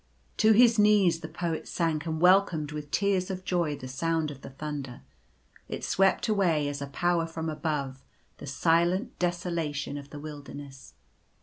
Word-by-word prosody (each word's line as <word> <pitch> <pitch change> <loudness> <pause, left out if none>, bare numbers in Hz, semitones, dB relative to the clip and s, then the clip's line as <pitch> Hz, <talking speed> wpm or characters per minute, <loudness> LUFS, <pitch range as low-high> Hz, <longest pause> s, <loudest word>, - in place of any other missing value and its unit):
To 220 0 +5
his 230 0 +5
knees 205 -5 +4
the 160 - -7
Poet 165 0 -4
sank 165 -2 -1
and 160 -1 -2
welcomed 180 -4 +4
with 150 -1 -6
tears 195 +1 +1
of 185 -1 -5
joy 170 -5 0
the 130 - -8
sound 160 +3 -1
of 140 -2 -11
the - - -9
thunder. 135 -3 -6 0.7
It - - -5
swept 195 +4 +2
away 175 -9 +2
as 145 0 -4
a 140 - -4
Powef 170 +3 0
from 160 0 -4
Above 145 -4 -3 0.4
the - - -8
silent 170 - +1
desolation 170 -5 -2
of 140 0 -12
the 145 - -8
wilderness. 145 -2 -10
160 Hz, 165 wpm, -28 LUFS, 145-180 Hz, 0.7 s, To